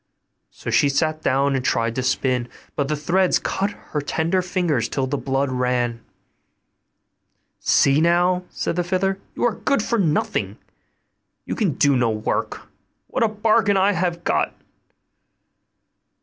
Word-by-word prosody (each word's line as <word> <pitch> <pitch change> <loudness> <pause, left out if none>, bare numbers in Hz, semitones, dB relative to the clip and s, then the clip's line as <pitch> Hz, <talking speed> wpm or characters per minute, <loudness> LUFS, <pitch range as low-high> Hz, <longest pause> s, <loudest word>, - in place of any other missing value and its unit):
So - - -7
she 145 - +4
sat 155 +2 0
down 140 0 +1
and 130 - -1
tried 115 -2 0
to 130 - -2
spin; 125 -1 0 0.3
but 140 - 0
the 150 - 0
threads 175 +5 +2
cut 200 +1 -1
her 155 -6 -6
tender 165 +5 0
fingers 175 - -1
till 135 - -1
the 135 +2 -2
blood 135 0 -1
ran. 125 -2 -1 1.6
'See 140 +2 +3
now,' 175 +2 +3
said 170 - -3
the 175 - +1
fiddler, 190 +2 0 0.2
'you - - -3
are 235 -3 +1
good 275 -7 0
for 235 0 0
nothing; 155 -5 0 0.9
you - - -3
can 195 -9 0
do 140 +1 +3
no 120 -2 +2
work: 110 -1 -2 0.5
what - - -2
a 230 - +5
bargain 215 -1 +2
I 195 +2 +4
have 175 -2 -2
got! - - 0
155 Hz, 150 wpm, -22 LUFS, 130-185 Hz, 1.6 s, a